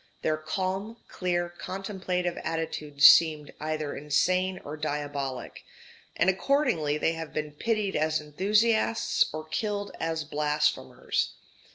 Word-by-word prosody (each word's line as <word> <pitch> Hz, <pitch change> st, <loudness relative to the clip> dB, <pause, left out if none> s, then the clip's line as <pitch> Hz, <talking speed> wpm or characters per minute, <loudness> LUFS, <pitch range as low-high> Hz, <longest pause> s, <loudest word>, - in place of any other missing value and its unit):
Their 155 Hz, -, +2 dB
calm, 190 Hz, +7 st, -3 dB
clear, 175 Hz, -2 st, -1 dB
contemplative 185 Hz, 0 st, -3 dB
attitude 160 Hz, -3 st, -3 dB
seemed 155 Hz, -2 st, +7 dB
either 155 Hz, -1 st, -3 dB
insane 180 Hz, +6 st, +1 dB
or 145 Hz, -, -5 dB
diabolic; 145 Hz, -3 st, -4 dB, 0.5 s
and 170 Hz, -, +2 dB
accordingly 190 Hz, -, +2 dB
they 165 Hz, -, +1 dB
have 165 Hz, -1 st, -7 dB
been 150 Hz, -1 st, -3 dB
pitied 210 Hz, +5 st, -1 dB
as 155 Hz, +1 st, +1 dB
enthusiasts 210 Hz, +9 st, +2 dB
or 155 Hz, 0 st, -6 dB
killed 205 Hz, +4 st, -2 dB
as 160 Hz, -1 st, -1 dB
blasphemers. 150 Hz, -, 0 dB
160 Hz, 110 wpm, -28 LUFS, 150-190 Hz, 0.5 s, seemed